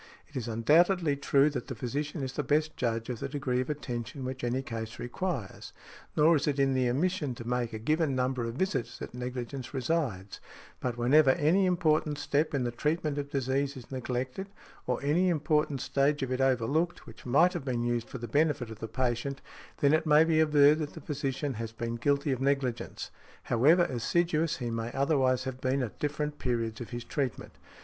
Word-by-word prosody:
It 145 - -22
is 125 -3 -3
undoubtedly 155 - +3
true 140 +1 +3
that 125 -4 -4
the 130 - -5
physician 145 +6 -3
is 130 -1 -4
the - - -1
best 155 +1 +1
judge 115 -2 -1
of 120 - -5
the - - -4
degree 130 -3 -1
of 130 - -5
attention 130 -2 -4
which 130 0 -5
any 125 +2 0
case 115 -3 -6
requires. 125 - -4 0.4
Nor 160 +2 +6
is 145 - -2
it 145 -1 +1
in 135 -1 +3
the 130 -1 +2
omission 150 0 0
to 120 -2 -8
make 125 -1 -1
a 110 - -4
given 155 +4 +1
number 130 -1 0
of 115 0 -4
visits 185 -6 -1
that - - -8
negligence 125 +1 -5
resides, 125 - -2 0.4
but 125 -2 -3
whenever 135 +4 +5
any 165 +8 +3
important 155 -4 +1
step 145 +2 0
in 135 - 0
the 120 - -1
treatment 150 +3 -1
of 140 0 -4
disease 135 +1 -1
is 125 0 -12
neglected, 130 +7 -3 0.4
or 125 -1 0
any 170 +6 +3
important 150 -3 +1
stage 140 +1 +1
of 130 - -3
it 130 +1 0
overlooked, 135 +6 +1
which - - -12
might 160 +8 +4
have - - -4
been 120 -3 -1
used 120 -1 -1
for - - -6
the 120 -1 -6
benefit 145 -2 +1
of 110 - -9
the 115 - -4
patient, 125 +3 -1 0.4
then 140 +1 +5
it 155 +1 +2
may 150 +1 +7
be 160 -1 +2
averred 150 -1 +5
that 150 -2 -4
the - - -8
physician 140 -1 -2
has 115 -1 -5
been 115 0 -4
guilty 140 +4 +1
of 130 -1 -2
negligence, 135 -3 -1 0.3
however 150 +10 +4
assiduous 165 +5 0
he 120 -2 -3
may 115 +1 -3
otherwise 135 -2 +2
have 130 -1 -6
been 130 +1 +1
at 115 - -6
different 150 0 -2
periods 115 -3 -2
of 120 - -6
his 120 -1 -5
treatment. 135 -4 -3
135 Hz, 200 wpm, -29 LUFS, 120-150 Hz, 0.4 s, may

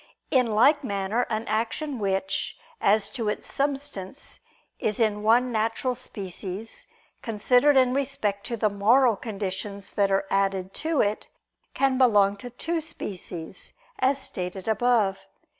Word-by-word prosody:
In 255 -4 +4
like 270 +7 +4
manner 200 +1 -1
an 220 0 -1
action 235 +6 -2
which, 195 -1 -1 0.2
as 205 +1 +3
to 230 -6 -2
its - - -3
substance, 275 -5 -3 0.4
is 215 +1 -1
in 215 -2 +2
one 240 +4 +3
natural 225 +3 0
species, 200 -3 -6 0.3
considered 245 +6 +3
in 255 -1 +4
respect 255 -8 -1
to 235 - -3
the 215 - +2
moral 230 +4 +4
conditions 200 -1 -4
that 200 -1 +2
are 195 0 +1
added 195 -1 0
to 315 -1 0
it, 205 +1 -1 0.5
can 270 -1 +2
belong 205 -6 +5
to 245 +5 -8
two 325 +7 -2
species, 185 - -7 0.3
as 265 +2 +3
stated 185 -6 -5
above 220 -3 +2
(Q. - - -22
220 Hz, 140 wpm, -26 LUFS, 200-255 Hz, 0.5 s, belong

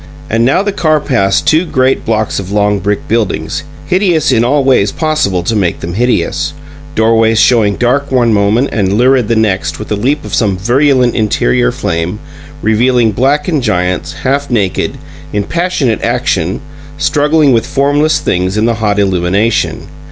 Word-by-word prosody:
And 115 +1 +1
now 135 +10 +2
the 205 - -1
car 155 -5 +1
passed 105 -9 0
two 160 +2 +3
great 130 -5 0
blocks 110 -2 -1
of 95 0 -7
long 105 0 +1
brick 100 +2 -2
buildings, 110 -2 -1 0.2
hideous 180 -5 +1
in 115 - +2
all 140 +3 +1
ways 125 -7 +2
possible 150 - -1
to 110 - -1
make 95 -5 -1
them 85 +1 -5
hideous; 125 +6 -1 0.4
doorways 110 0 +2
showing 110 -5 +3
dark 135 +5 0
one 120 -3 +2
moment 105 +6 +1
and 100 -3 0
lurid 125 +1 +2
the 115 - +1
next 105 -4 0
with 105 - -8
the 105 - 0
leap 135 +8 -1
of - - -8
some 100 -5 +1
virulent 125 +4 +2
interior 60 - +1
flame, 85 +4 -3 0.5
revealing 115 +1 +2
blackened 145 - 0
giants, 90 -6 -1
half 140 +2 -2
naked, 105 -7 -1 0.4
in 105 -1 0
passionate 165 - -1
action, 85 +4 -1 0.4
struggling 145 0 +2
with 115 +1 0
formless 145 +2 +1
things 90 +3 -1
in 110 - +1
the 115 - +2
hot 105 -1 0
illumination. 100 +3 0
115 Hz, 160 wpm, -12 LUFS, 100-140 Hz, 0.5 s, two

